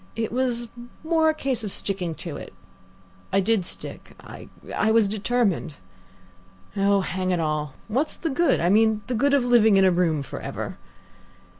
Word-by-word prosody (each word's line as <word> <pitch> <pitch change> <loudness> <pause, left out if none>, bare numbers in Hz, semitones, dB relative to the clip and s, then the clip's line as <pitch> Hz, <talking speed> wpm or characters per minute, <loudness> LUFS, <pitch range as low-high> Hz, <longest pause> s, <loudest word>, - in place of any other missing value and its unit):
It 225 -1 -2
was 240 -1 -1 0.4
more 320 0 +3
a - - +2
case 265 -6 -1
of 205 - -3
sticking 185 -5 -1
to 160 -4 -5
it. - - -9 0.8
I 195 - +3
did 205 0 +1
stick. - - -9
I - - -11 0.3
I 215 - +2
was 220 -2 +4
determined. 205 -6 -1 1.0
Oh, 200 0 +3
hang 185 0 -3
it 180 -2 +1
all! 150 -3 -2
what's 265 +8 -1
the 325 - -3
good 340 +5 +2
I 175 - +1
mean, 215 +1 +3
the 250 - -3
good 280 +5 +2
of 265 -3 +2
living 220 -4 +5
in 195 - +5
a 185 - +5
room 165 -5 +1
for - - -7
ever? - - -6
215 Hz, 175 wpm, -24 LUFS, 185-245 Hz, 1.0 s, living